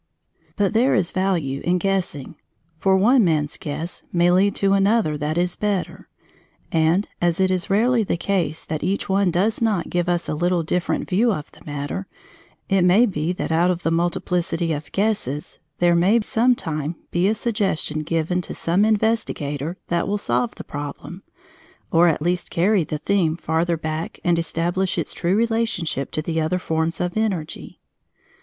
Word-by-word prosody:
But 205 -1 +1
there 245 +5 +3
is 185 -6 +1
value 170 -8 -1
in 180 +1 +2
guessing, 180 -7 -2 0.5
for 190 -1 +3
one 235 +5 +5
man's 155 -4 +1
guess 160 +4 -6
may 175 0 +3
lead 195 +3 +3
to 195 0 +2
another 200 -4 +2
that 150 +2 -2
is 180 0 0
better, 205 -3 -2 0.6
and, 165 +5 +2
as 175 0 +1
it 190 0 +3
is 185 0 -1
rarely 230 +4 +3
the 185 - -1
case 170 -4 -1
that 155 -1 -3
each 190 +4 -1
one 195 -1 +2
does 200 +7 0
not 210 -7 0
give 175 0 0
us 175 -1 0
a - - -1
little 175 +2 +1
different 180 +3 -1
view 225 +6 +2
of 155 -8 -4
the - - -18
matter, 140 -10 -4 0.6
it 195 -1 +2
may 190 +7 +5
be 170 -6 -1
that 180 - -4
out 170 +3 +3
of 180 -1 -1
the 165 - +1
multiplicity 170 0 0
of 150 0 -6
guesses 195 - -2 0.2
there 175 0 +3
may 185 +7 +4
some 240 +4 +2
time 155 -4 -4 0.2
be 175 +2 +2
a 215 - +2
suggestion 205 -9 -1
given 165 +3 -1
to - - -7
some 175 +5 +1
investigator 185 - 0
that 170 0 0
will 205 +1 0
solve 120 - -1
the - - -8
problem, 145 +5 -7 0.7
or 170 +1 +5
at 155 -2 +1
least 175 +1 -1
carry 190 +2 +2
the 150 - -4
theme 170 -1 +1
farther 165 +1 0
back 160 +1 -4
and 175 -1 +2
establish 175 +3 -1
its - - -2
true 180 +2 0
relationship 225 - 0
to 155 - -3
the 160 0 -1
other 160 +3 0
forms 160 -2 -1
of 180 0 -2
energy. 190 -8 -3
175 Hz, 175 wpm, -22 LUFS, 160-195 Hz, 0.7 s, one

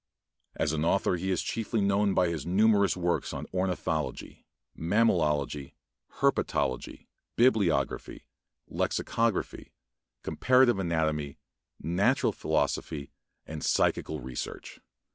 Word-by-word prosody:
As 75 - 0
an 75 0 -1
author 90 +2 +2
he 95 +2 -3
is 95 - 0
chiefly 115 0 -2
known 100 0 +2
by 90 - +3
his 80 -5 -3
numerous 100 +2 +3
works 90 -1 -1
on - - -5
ornithology, 90 -2 -3 0.3
mammalogy, 75 - +1 0.4
herpetology, 65 - -1 0.3
bibliography, 100 - +1 0.4
lexicography, 115 -3 -1 0.5
comparative 125 -4 +3
anatomy, 80 -5 -1 0.4
natural 85 +6 +1
philosophy, 70 -3 -2 0.3
and 80 -1 -7
psychical - - +1
research. 65 0 -7
90 Hz, 95 wpm, -28 LUFS, 75-100 Hz, 0.5 s, by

